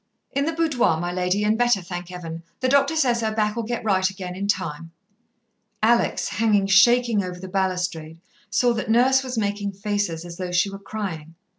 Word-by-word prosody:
"In 280 +1 0
the 325 - 0
boudoir, 295 - +1
my 175 +1 -2
lady, 180 +3 0
and 210 +1 +2
better, 240 -3 +3
thank 175 -1 -7
Heaven. 165 -2 -7 0.2
The 255 - +2
doctor 280 +4 +3
says 245 -7 +2
her 220 -1 0
back'll 215 +1 0
get 235 +1 -4
right 190 -3 +2
again 185 -2 -7
in 200 +2 -3
time." 165 -5 -2 0.9
Alex, 235 +2 +2
hanging 205 +2 +2
shaking 225 +2 +4
over 180 -1 -6
the 190 - -8
balustrade, 180 -4 -2 0.3
saw 245 -1 +2
that 220 -1 -4
Nurse 255 +4 +4
was 255 -2 -5
making 205 -1 -1
faces 200 -4 -2
as 170 -1 -9
though 180 -1 -4
she 180 +3 +2
were 195 - -8
crying. 185 -6 -6
200 Hz, 185 wpm, -23 LUFS, 180-235 Hz, 0.9 s, shaking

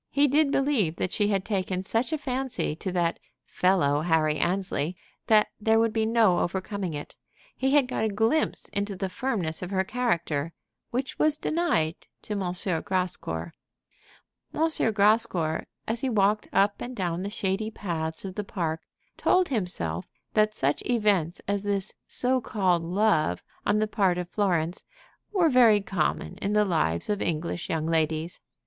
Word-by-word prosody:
He 285 +1 +3
did 290 +2 +3
believe 265 - +1
that 185 - -2
she 205 - +1
had 195 -2 0
taken 185 -3 -1
such 225 +8 0
a 315 - 0
fancy 260 - -2
to 185 +3 -4
that 175 -2 0 0.3
"fellow 160 -6 +2
Harry 155 -2 +2
Annesley" 180 -3 -1 0.3
that 215 -1 +5
there 220 +1 +3
would 225 -1 +2
be 220 -1 +1
no 220 -6 +4
overcoming 190 -1 -2
it. 145 - -7 0.4
He 265 +2 +1
had 280 -3 +4
got 220 - -1
a - - +1
glimpse 225 +9 +1
into 200 0 -2
the 190 0 -3
firmness 185 -8 -2
of 180 - -4
her 190 -1 +1
character 170 -9 -1 0.4
which 260 +3 -3
was 305 -1 +3
denied 300 - +1 0.3
to 210 - -4
M. 205 - -2 0.4
Grascour. 160 - -2 1.0
M. 315 -7 +1
Grascour, 205 -6 +2 0.2
as 225 +2 -1
he 265 - 0
walked 210 -1 +2
up 200 +1 +2
and 250 +1 -5
down 175 -3 -2
the 200 - -3
shady 205 +1 -1
paths 165 -6 -4
of 190 - -5
the 210 - -3
park, 165 -5 -3 0.4
told 365 -1 +3
himself 135 - -2 0.3
that 215 0 +3
such 140 +2 0
events 205 -8 +1
as 200 0 0
this 200 -1 -1
so 255 +1 +1
called 185 -6 +1
love 170 - +1 0.2
on 210 - +3
the 215 0 +1
part 195 -5 +1
of 180 -1 -3
Florence 180 -3 0 0.5
were 370 -5 +3
very 240 -7 +6
common 190 0 -2
in 205 0 -1
the 210 0 +4
lives 155 - +1
of 205 -1 -1
English 170 +1 -2
young 160 -1 -1
ladies. 160 +1 0
195 Hz, 165 wpm, -27 LUFS, 170-225 Hz, 1.0 s, very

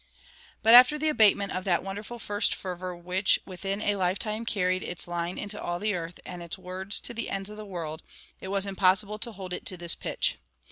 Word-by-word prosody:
"[145:1] - - -33 0.6
But 225 - +7
after 250 +5 +9
the 310 +1 +1
abatement 205 -7 +4
of 185 - -3
that 175 -3 +2
wonderful 205 +5 -6
first 205 -2 0
fervor 180 -1 -5
which 180 +3 +2
within 195 +2 -4
a 205 -1 +1
lifetime 205 +5 -1
carried 185 -3 +1
"its 175 - -5
line 175 0 -3
into 205 0 -2
all 175 0 -2
the 210 +3 0
earth, 170 -1 -5
and 180 -1 -7
its 170 +1 -5
words 185 +2 -2
to 240 - -4
the 230 -1 -4
ends 195 +1 -3
of 210 - -9
the 215 -1 -8
world," 165 -4 -5 0.4
it - - -7
was 195 0 +1
impossible 195 +2 +2
to 235 +2 -1
hold 190 -4 -7
it - - -4
to 185 - +2
this 170 -1 0
pitch. - - -1
195 Hz, 220 wpm, -28 LUFS, 180-210 Hz, 0.6 s, after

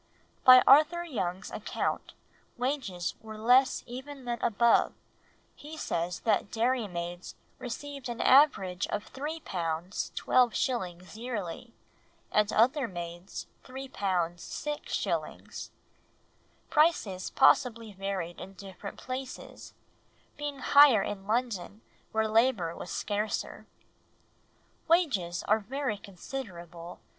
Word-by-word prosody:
By 255 0 +9
Arthur 310 +5 +6
Young's 190 - -3
account - - -3 0.4
wages 240 - -2
were 220 -1 -9
less 250 +4 +4
even 265 +2 -8
than 240 -1 -3
above, 235 +1 +3 0.6
he 310 +2 -10
says 170 - -2
that 210 -2 +1
dairymaids 195 -8 -2 0.2
received 275 +1 -6
an 235 - -5
average 195 -11 +4
of 210 - -5
£3, 300 +4 -4
12s. 185 - -1
yearly, 230 -1 -5 0.6
and 210 0 +3
other 260 +4 +3
maids 175 -1 -7 0.2
£3, 265 +1 -8
6s. 185 - -3 1.0
Prices 295 - +2
possibly 230 -3 +3
varied 190 -3 -4
in 190 +1 -9
different 195 +1 -9
places, 260 +1 -7 0.6
being 290 -1 -5
higher 280 -8 +7
in 195 -1 -5
London 220 -3 -2 0.3
where 220 0 +1
labour 220 -7 +2
was - - -8
scarcer. 210 +1 -3 1.2
"Wages 260 - +2
are 215 +1 +3
very 250 0 -3
considerable 175 -5 -8
220 Hz, 95 wpm, -29 LUFS, 185-260 Hz, 1.2 s, By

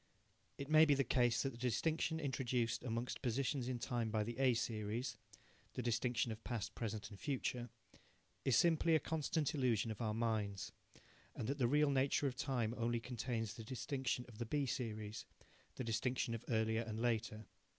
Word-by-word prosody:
It 140 - -5
may 155 +1 +8
be 145 -2 +5
the 135 - +3
case 120 -1 +3
that 135 - 0
the 115 - -12
distinction 160 +6 +1
introduced 125 -5 0
among 120 0 -2
positions 130 +1 0
in 130 -1 -1
time 120 -2 -1
by 110 -1 +1
the 120 +2 -4
A 130 -3 +5
series 115 +2 -2 0.6
the 125 - -2
distinction 120 0 +1
of 110 +1 -7
past, 115 -5 -3
present 110 -2 -4
and 100 - -10
future 125 -3 -2 0.7
is 135 - +3
simply 165 +3 +5
a - - +5
constant 155 -1 0
illusion 120 -6 +2
of 110 - -6
our 110 -2 0
minds, 110 -4 -1 0.6
and 110 - -3
that 140 +2 -1
the 120 - +4
real 150 +2 +4
nature 135 +1 +2
of 130 -2 0
time 125 -4 0
only 120 0 +1
contains 115 -2 -3
the 115 -1 -8
distinction 130 +1 -2
of 115 -3 -13
the 120 - -1
B 145 +3 +1
series 110 -4 -3 0.5
the - - -3
distinction 115 +1 0
of 115 0 -4
earlier 110 -1 +2
and 110 -1 -4
later. 110 -2 0
120 Hz, 180 wpm, -39 LUFS, 115-135 Hz, 0.7 s, may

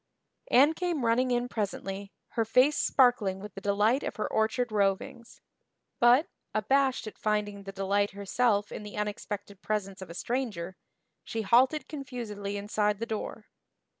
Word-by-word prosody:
Anne 285 +5 +6
came 335 -6 -1
running 245 +3 +3
in 245 0 +1
presently, 200 -3 -4 0.2
her 230 - 0
face 255 +6 +4
sparkling 240 -8 +3
with 205 0 -9
the 195 - -8
delight 205 +6 +2
of - - -4
her 215 - -2
orchard 225 +2 0
rovings; 205 +3 -1 0.6
but, 245 +6 +6 0.3
abashed 265 +5 +2
at 215 - -9
finding 205 -2 -1
the 195 - -5
delight 200 +1 +1
herself 205 +1 0
in - - -6
the 210 0 -8
unexpected 205 -1 -4
presence 195 -3 -3
of 190 - -8
a 170 - -8
stranger, 205 -7 -3 0.5
she 225 -1 -3
halted 260 +8 +4
confusedly 230 -8 -5
inside 210 0 0
the 230 - -3
door. 220 -1 -5
215 Hz, 150 wpm, -29 LUFS, 200-245 Hz, 0.6 s, Anne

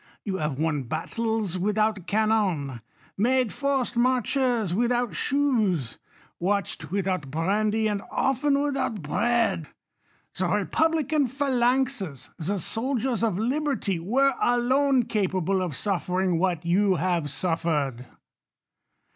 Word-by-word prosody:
You 195 -3 -2
have 150 -5 -2
won 155 -1 0
battles 210 - -2
without 210 -1 0
cannon; 195 - 0 0.4
made 250 +1 +2
forced 275 -4 -1
marches 245 -4 +1
without 240 0 +1
shoes; 215 - +1 0.4
watched 200 +3 -1
without 185 -7 -1
brandy, 210 +8 +1
and 205 -2 -1
often 275 +1 +1
without 270 - -1
bread. 225 -1 +1 0.7
The 185 - 0
republican 295 - +1
phalanxes, 250 - 0
the 190 +5 -1
soldiers 240 - -1
of 220 -6 +1
liberty 245 - -1
were 265 +10 +2 0.2
lone 260 +1 +3
capable 190 -3 0
of 180 -4 -2
suflering 185 -1 0
what 175 -2 0
you 190 +3 +3
have 170 -3 0
suffered. 150 -6 -1
210 Hz, 105 wpm, -26 LUFS, 175-250 Hz, 0.7 s, lone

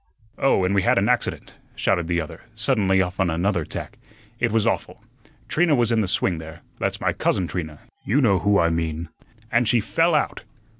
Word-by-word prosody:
"Oh, 135 -8 +3
and 95 - +1
we 100 - +3
had - - +2
an 100 +1 +2
accident," 125 -1 -1 0.2
shouted 85 -2 0
the 85 0 0
other, 80 +1 -7
suddenly 105 -5 +2
off 90 +1 -6
on 95 -2 +2
another 85 +2 0
tack. - - -7 0.4
"It 120 -2 +1
was 110 -1 +2
awful. - - -2 0.4
Trina 165 -2 +2
was 120 -2 +2
in 115 -1 +3
the 100 - -1
swing 90 -2 0
there 80 +1 -10 0.2
that's - - -1
my - - 0
cousin 95 - 0
Trina, 80 -4 -5 0.2
you 120 +8 +1
know 100 -9 +3
who 100 +2 +3
I 85 -2 +3
mean 80 0 -3 0.4
and 115 0 +2
she 120 - +4
fell - - +1
out. - - 0
95 Hz, 200 wpm, -23 LUFS, 85-115 Hz, 0.4 s, she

